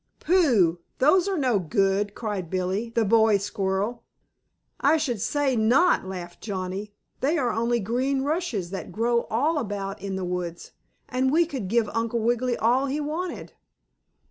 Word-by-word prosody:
"Pooh! 240 - +3 0.2
Those 345 +8 +4
are 390 -2 0
no 250 -8 +2
good!" 195 +2 0
cried 205 -7 -4
Billie, 185 +5 -1
the 230 -1 +1
boy 220 0 +4
squirrel. 200 +3 -2 0.8
"I 295 +4 +4
should 250 -9 -2
say 285 0 +1
not!" 240 - +3
laughed 175 -2 -7
Johnnie, 200 0 -5 0.2
"They 300 +6 +1
are 245 -5 +1
only 235 +1 0
green 255 +6 0
rushes 285 - -2
that 195 - -6
grow 235 +1 0
all 295 +8 +1
about 205 -4 -4
in 195 -1 -4
the 190 -1 -3
woods, 175 -1 -4 0.4
and 260 +1 0
we 335 +3 +4
could 265 - -5
give 225 +2 +2
Uncle 230 +1 -1
Wiggily 240 +2 0
all 250 +5 +2
he 280 +3 -2
wanted." 315 +5 -4
230 Hz, 155 wpm, -25 LUFS, 195-270 Hz, 0.8 s, Those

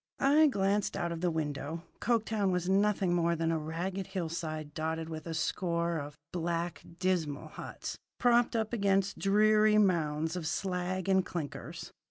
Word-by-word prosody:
I 300 +3 +6
glanced 200 -4 +1
out 175 -2 -1
of 165 -1 -4
the 180 - +2
window. 155 0 -3 0.2
Coketown 220 -3 +1
was 180 -1 -1
nothing 195 -1 +2
more 170 -1 +2
than 165 0 0
a 165 - 0
ragged 175 +5 -3
hillside 160 -5 -4
dotted 160 +1 -2
with 160 0 -6
a 165 - -3
score 170 0 0
of 145 0 -7
black 170 0 -2 0.2
dismal 170 -6 -1
huts - - -7 0.2
propped 240 -1 +3
up 220 0 -1
against 195 -2 +1
dreary 215 +1 +4
mounds 165 -5 +2
of 170 -3 -3
slag 185 +1 -2
and 190 -1 +4
clinkers. 165 -6 -6
180 Hz, 155 wpm, -31 LUFS, 160-195 Hz, 0.2 s, I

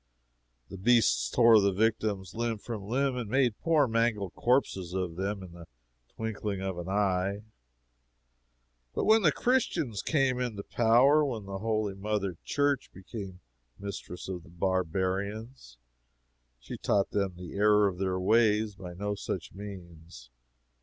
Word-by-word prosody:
The 95 - -8
beasts 120 +3 +3
tore 115 -3 +6
the 100 0 +3
victims 105 -2 0
limb 115 -1 -1
from 105 -2 -7
limb 135 +3 0
and 120 -4 -4
made 125 -3 +2
poor 155 -4 +3
mangled 115 -4 0
corpses 95 -8 0
of 90 -3 -2
them 95 +2 -3
in 90 - -10
the 85 -1 -12 0.5
twinkling 105 -3 -3
of 95 -2 -3
an 85 +1 -6
eye. 100 0 0 1.5
But - - 0
when 220 +1 +6
the 165 -6 +4
Christians 155 - 0
came 135 -5 +1
into 115 -5 -3
power, 125 +8 +4
when 115 -8 -3
the 95 0 -5
holy 110 -1 -1
Mother 100 -2 -2
Church 145 -2 0
became 95 -1 -9 0.4
mistress 100 -3 -7
of 90 -2 -5
the - - -17
barbarians, 95 - -2 0.8
she - - -8
taught 100 -1 +1
them 100 -3 -1
the 90 -1 -9
error 105 0 +4
of 90 -2 -4
their 95 -1 -1
ways 110 +1 +3
by 90 -3 -9
no 105 +3 -2
such 100 - -5
means. 85 -9 -11
100 Hz, 145 wpm, -29 LUFS, 95-115 Hz, 1.5 s, tore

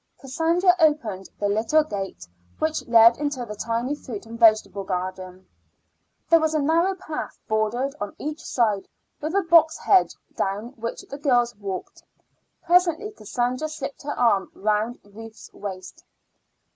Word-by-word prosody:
Cassandra 330 +7 +2
opened 245 - +1
the 205 - 0
little 220 +10 +2
gate 195 - -6 0.3
which 315 0 -2
led 230 +1 +6
into 290 -4 -2
the 210 - -7
tiny 230 +5 -2
fruit 235 -7 -7
and 230 +1 -9
vegetable 215 -3 +4
garden. 185 0 -5 0.8
There 330 - +6
was 315 0 0
a - - +3
narrow 335 +6 +2
path, 305 - -6
bordered 220 +5 0
on 205 -1 -4
each 305 +2 -5
side 215 -5 0 0.3
with 310 +5 -3
a 395 - +3
box 330 -1 +5
hedge, 380 -2 +3 0.2
down 200 +4 -2
which 235 -3 -6
the 280 - -9
girls 245 -5 +2
walked. 195 -2 -6 0.6
Presently 355 +3 +2
Cassandra 250 - -2
slipped 285 -3 -6
her 290 +1 -5
arm 215 -5 +2
round 215 +3 0
Ruth's 220 +2 -13
waist. 190 -2 -8
240 Hz, 145 wpm, -24 LUFS, 210-310 Hz, 0.8 s, led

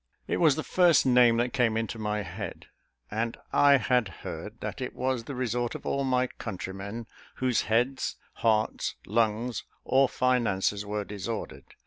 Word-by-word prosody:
It - - -1
was 155 -5 +5
the 155 - -3
first 175 -4 +4
name 125 -2 +5
that 120 +1 0
came 115 -4 +2
into 115 0 -3
my 105 -1 -1
head; 95 +2 -7 0.5
and 115 +2 -2 0.2
I 140 -1 +6
had 125 -4 +2 0.2
heard - - -6
that - - -5
it - - -4
was 130 -2 -1
the 140 - -6
resort 120 -1 -1
of - - -8
all 140 - 0
my 130 -1 +2
countrymen 100 0 -6 0.3
whose 130 -2 +1
heads, 125 +4 +1 0.2
hearts, 110 -1 +1
lungs, 115 +1 0 0.2
or 135 0 +3
finances 105 -6 +1
were 105 0 -2
disordered. 105 +2 -6
115 Hz, 155 wpm, -28 LUFS, 105-130 Hz, 0.5 s, I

